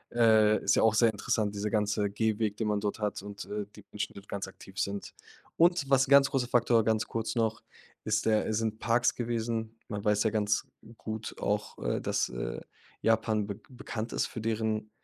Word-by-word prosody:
Äh, 110 -2 +5
ist - - +3
ja - - +4
auch 110 -1 +5
sehr 115 +1 +4
interessant, 110 -1 -1
dieser 105 +1 -2
ganze 105 -1 +1
Gehweg, 110 0 0
den 110 0 -2
man 105 -1 +1
dort 105 +1 -3
hat 105 -2 -2
und, 100 0 -7
äh, 105 0 -4
die 105 - -13
Menschen 105 - -4
dort 100 +1 -13
ganz 100 -1 -4
aktiv 95 0 -11
sind. 100 +1 -3 0.4
Und 170 -4 +3
was 135 0 +4
'n - - -10
ganz 140 0 +7
großer 130 -3 0
Faktor, 120 -2 +3
ganz 110 -1 +2
kurz 115 +1 -3
noch 110 -2 0 0.4
ist 105 -1 +1
der 110 -1 +3
äh, - - -1
sind 110 0 -1
Parks 120 +1 +2
gewesen. 115 -1 -2
Man 105 -1 -4
weiß 105 0 +3
ja 110 - +3
ganz 105 -1 0 0.3
gut 110 0 -6
auch, 105 +1 -1
äh, - - -1
dass, - - 0
äh, - - -4 0.4
Japan 110 -1 +2
bek 105 +1 -8
bekannt 120 -3 -6
ist - - 0
für - - -7
deren, 110 -1 -1
110 Hz, 205 wpm, -30 LUFS, 105-115 Hz, 0.4 s, ganz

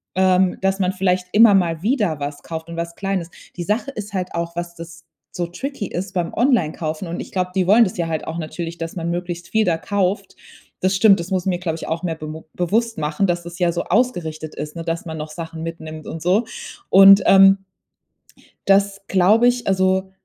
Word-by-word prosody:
Ähm, 185 0 +3
dass 195 0 0
man 185 0 +1
vielleicht 185 -1 0
immer 220 -1 +7
mal 170 -3 +1
wieder 210 - 0
was 145 0 -5
kauft 160 0 -7
und 170 - -7
was 170 0 -4
Kleines. 195 -3 -3 0.3
Die 175 - -3
Sache 215 +9 -1
ist 210 -4 -7
halt 185 -2 -2
auch, 170 0 -3
was 175 0 -4
das 165 0 -11 0.3
so 175 -1 -3
tricky 240 +3 -5
ist 190 +2 -5
beim 175 -3 -2
Onlinekaufen, 170 - 0
und 170 - -4
ich - - -7
glaub, 180 -1 -1
die 185 -2 0
wollen 225 +4 +7
das 185 - -2
ja 170 -1 -1
halt 160 -2 -3
auch 160 +1 -4
natürlich, 165 +1 -5
dass 165 +1 -6
man 170 0 -3
möglichst 175 0 -5
viel 220 0 +2
da 170 -2 +1
kauft. 195 +3 -2 0.5
Das 190 +1 +2
stimmt, 195 -2 +5
das 170 +3 -5
muss 185 -1 0
mir, 180 -2 0
glaub 165 -3 -2
ich, 165 - -7
auch 165 +2 -3
mehr 165 -2 -2
bemu 155 0 -8
bewusst 225 +6 0
machen, 150 +6 0
dass 175 -1 -1
es 175 +1 -9
ja 175 -1 +2
so 170 - -2
ausgerichtet 160 -11 -1
ist, 150 +1 -6
ne, 165 - -5
dass 165 +1 -3
man 160 -1 -6
noch 150 0 -6
Sachen 165 0 -7
mitnimmt 160 -2 -7
und 160 - -6
so. 190 +7 +2 0.4
Und, 195 +1 +8
ähm 195 0 +6 1.0
das 195 0 +3
glaube 205 +6 +4
ich, 245 -2 0
also 190 0 +1
180 Hz, 215 wpm, -20 LUFS, 165-195 Hz, 1.0 s, Und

